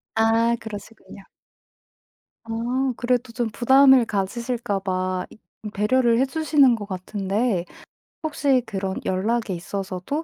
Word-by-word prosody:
아 225 +1 +3
그러시군요. 205 -2 -10 1.2
아 245 +4 -1
그래도 245 0 -1
좀 240 -1 -1
부담을 265 +2 +5
가지실까 225 +1 -2
봐 185 -1 -2 0.4
이 210 - -6
배려를 235 +3 +2
해 265 - +4
주시는 285 -3 +3
것 210 -2 -6
같은데 195 +1 -2 0.6
혹시 285 -4 +1
그런 195 -2 -3
연락에 215 +3 0
있어서도 190 - -4
225 Hz, 245 characters per minute, -23 LUFS, 195-250 Hz, 1.2 s, 부담을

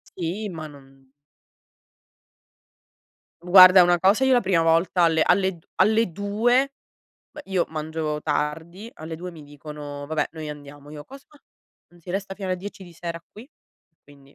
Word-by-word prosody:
Sì, 190 +5 -4
ma 160 -3 -7
non 135 -2 -18 2.3
Guarda 185 +1 +8
una 175 0 +2
cosa: 195 +8 +3
io 265 0 +4
la 245 - +5
prima 185 -5 +1
volta 165 +2 +2
alle 160 -1 +3
alle 190 0 +1
d 160 - -25
alle 220 -3 +2
2 230 +8 +1 0.6
beh, 300 - -11
io 190 -3 0
mangio 155 -1 -4
tardi 165 +8 -4
alle 160 +1 -8
2 180 +2 -7
mi 165 -3 -13
dicono: 145 0 -9
"Vabbè 155 0 -2
noi 160 -2 -7
andiamo." 145 -1 -11
Io: 150 -1 -10
"Cosa? 275 +1 -14 0.6
Non 175 0 -22
si 170 - -10
resta 195 +1 -4
fino 195 -1 -6
alle 185 - -1
10 195 +2 -9
di 175 - -14
sera 170 0 -7
qui?" 225 +6 -13 0.5
Quindi 140 -1 -20
170 Hz, 160 wpm, -23 LUFS, 150-195 Hz, 2.3 s, Guarda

